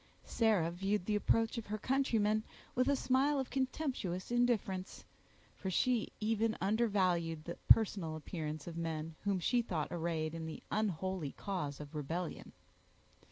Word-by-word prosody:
Sarah 210 -8 +2
viewed 195 +2 -1
the 210 - +1
approach 225 +3 +2
of 225 - -9
her 215 +1 -2
countrymen 220 -4 +2 0.3
with 255 +2 +2
a 285 - +4
smile 270 +2 +2
of 265 - -3
contemptuous 255 - -2
indifference; 225 -6 0 0.5
for 190 - -4
she 235 +5 +1
even 220 +1 +1
undervalued 185 -6 +1
the 170 +2 -6
personal 190 -7 +5
appearance 155 -1 -5
of 170 - -6
men 165 -1 -3
whom 200 -2 +2
she 245 +7 +2
thought 165 -9 -2
arrayed 165 -2 -1
in 165 -1 -4
the 160 - -7
unholy 190 -6 -1
cause 175 -9 -3
of 150 0 -9
rebellion. 160 +4 -4
195 Hz, 145 wpm, -35 LUFS, 165-225 Hz, 0.5 s, personal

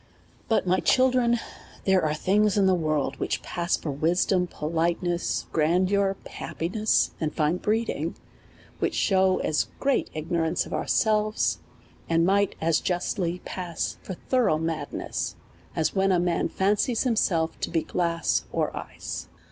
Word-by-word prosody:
But, 225 - +2
my 185 +1 +2
children, 255 -2 +3 0.5
there 190 -1 +4
are 155 -1 +1
things 205 +5 +2
in 200 - +4
the 190 - +4
world 155 -5 0
which - - -2
pass 175 +1 -1
for 150 - -4
wisdom, 180 +5 +1
politeness, 170 +2 -1
grandeur, 185 +5 +2
happi 165 +2 -5
oess, 215 0 +2
and 155 -1 0
fine 155 +3 +1
breeding, 210 -7 -1 0.6
which - - 0
shew 190 -2 +3
as 150 - +1
great 275 -1 +1
ignorance 160 +1 0
of - - -8
ourselves, 215 -1 +1 0.5
and 165 0 +3
might 200 +2 +2
as 165 0 +2
justly 180 0 -2
pass 175 -3 -4
for 190 - -6
thorough 245 -6 +1
madness, 160 0 -3 0.4
as 160 - +1
when 195 0 +2
a 180 - +3
man 175 -1 0
fancies 210 +4 +1
himself 185 -10 +1
to - - -2
be 165 - 0
glass, 170 -2 0
er - - 0
ice. - - -6
180 Hz, 140 wpm, -26 LUFS, 165-200 Hz, 0.6 s, there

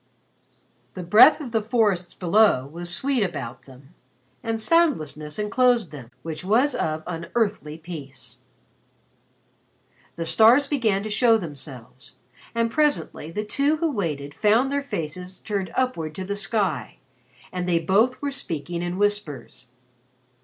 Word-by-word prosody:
The 180 - -5
breath 210 - +7
of 260 -5 -7
the 225 -1 +1
forests 210 -6 0
below 190 -6 +3
was 170 +5 -6
sweet 260 +7 0
about 145 - -4
them, 135 +4 -16 0.5
and 225 -1 -2
soundlessness 155 - +1
enclosed 235 +2 +2
them 135 -6 -10
which 160 0 -6
was 240 +9 +2
of 155 -6 -2
unearthly 170 -2 -2
peace. 155 -5 -10 1.8
The 165 - -4
stars 220 - +6
began 225 -9 0
to 215 - -5
show 230 +1 +4
themselves, 140 - -9 0.4
and 230 0 +1
presently 295 - 0
the 210 +6 -4
two 280 +8 +1
who 325 0 0
waited 150 - -3
found 225 - +2
their 285 0 0
faces 180 - -6
turned 200 -4 -3
upward 165 -13 -1
to 190 - -5
the 200 +1 -3
sky 195 - -1 0.5
and 180 0 -3
they 170 - +3
both 205 - +2
were 285 - -1
speaking 170 - -4
in 175 +1 -3
whispers. 155 - -2
190 Hz, 135 wpm, -24 LUFS, 155-230 Hz, 1.8 s, breath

